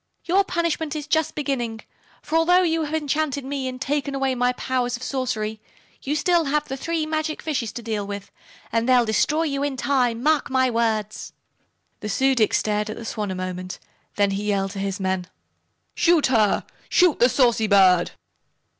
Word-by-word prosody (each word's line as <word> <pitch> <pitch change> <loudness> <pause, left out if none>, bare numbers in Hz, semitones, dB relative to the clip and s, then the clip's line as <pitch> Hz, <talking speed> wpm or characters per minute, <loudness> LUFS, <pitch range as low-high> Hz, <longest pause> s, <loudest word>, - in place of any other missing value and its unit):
Your 380 +3 +3
punishment 335 -4 -2
is 300 -2 -4
just 315 0 0
beginning, 240 -6 -2 0.4
for 310 - -3
although 355 +3 +4
you 325 -2 +1
have 300 +1 -3
enchanted 295 -2 -1
me 270 -1 -3
and 255 0 -5
taken 280 0 -2
away 270 -1 0
my 250 0 +1
powers 250 -1 -1
of 250 - -11
sorcery 220 -5 -3 0.4
you 280 - -2
have - - 0
still 345 +1 +3
the 290 -1 -1
three 325 +3 -2
magic 310 0 -2
fishes 265 -8 -2
to 240 - -7
deal 215 -3 -3
with, 200 0 -7 0.4
and 230 +2 0
they'll 250 -2 +5
destroy 300 +8 +1
you 280 -3 -2
in 285 -2 -2
time, 250 -4 +1
mark 305 -1 +2
my 260 -1 +2
words." 220 -2 -1 0.7
The 210 - -5
Su 265 +5 +2
dic 225 -4 +2
stared 210 0 0
at 215 - -5
the 230 - -8
Swan 210 -2 -3
a 190 - -3
moment. 185 0 -5 0.4
Then 200 -1 +2
he 200 +1 -3
yelled 195 -2 0
to 195 - -6
his 195 0 -3
men: 190 -1 -1 0.7
"Shoot 335 -3 +3
her! 220 -6 +2 0.2
Shoot 360 -4 +4
the 245 - +5
saucy 235 -4 +3
bird!" 185 -3 +5
255 Hz, 185 wpm, -23 LUFS, 215-300 Hz, 0.7 s, they'll